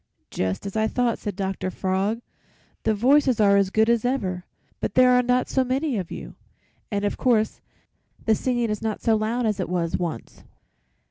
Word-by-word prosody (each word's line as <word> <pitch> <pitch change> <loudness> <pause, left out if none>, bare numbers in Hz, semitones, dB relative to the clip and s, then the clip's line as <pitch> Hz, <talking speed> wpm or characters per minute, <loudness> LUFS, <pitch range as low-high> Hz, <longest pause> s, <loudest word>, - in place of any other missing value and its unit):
"'Just 95 - -2
as 200 - -6
I 220 0 +2
thought,' 245 0 0
said 205 - -4
Dr. 190 -1 -3
Frog, 195 +5 -1 0.6
'the 220 - +1
voices 260 +2 +3
are 200 -1 +5
as 200 -1 +3
good 220 +2 +2
as 235 -1 +2
ever, 195 -9 -1 0.3
but - - -3
there 255 0 +6
are 250 0 +5
not 250 0 +1
so 265 - +1
many 265 +2 -1
of 180 - -5
you, - - -8 0.6
and, 205 -1 -1
of 205 - -1
course, 225 -4 +1 0.6
the 220 - +4
singing 240 0 0
is 210 - -3
not 220 -1 -3
so 225 -2 +3
loud 225 +3 -1
as 210 -3 0
it - - -2
was 175 -2 -1
once. 165 -9 -5
220 Hz, 190 wpm, -24 LUFS, 195-245 Hz, 0.6 s, there